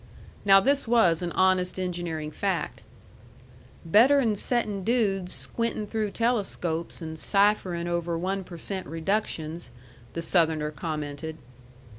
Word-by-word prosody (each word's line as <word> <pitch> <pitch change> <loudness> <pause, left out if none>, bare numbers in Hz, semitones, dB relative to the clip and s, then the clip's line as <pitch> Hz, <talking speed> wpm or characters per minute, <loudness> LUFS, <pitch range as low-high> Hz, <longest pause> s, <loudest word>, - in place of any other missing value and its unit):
Now 195 -1 +8
this 275 +5 +1
was 200 -9 +4
an 175 -1 -2
honest 185 0 +2
engineering 170 -4 -3
fact. 180 - -2 1.0
"Better'n 230 +5 +5
settin' 210 -3 -1
dudes 195 -5 +1
squintin' 230 -2 -3
through 215 0 -2
telescopes 195 -8 -1
and 160 0 -6
cypherin' 195 -4 +2
over 170 -1 -1
one 190 +3 -2
per 175 -1 -10
cent 190 +3 -4
reductions," 165 -3 -2 0.4
the 165 - -4
Southerner 160 -4 +2
commented. 155 0 -5
185 Hz, 115 wpm, -27 LUFS, 165-210 Hz, 1.0 s, Now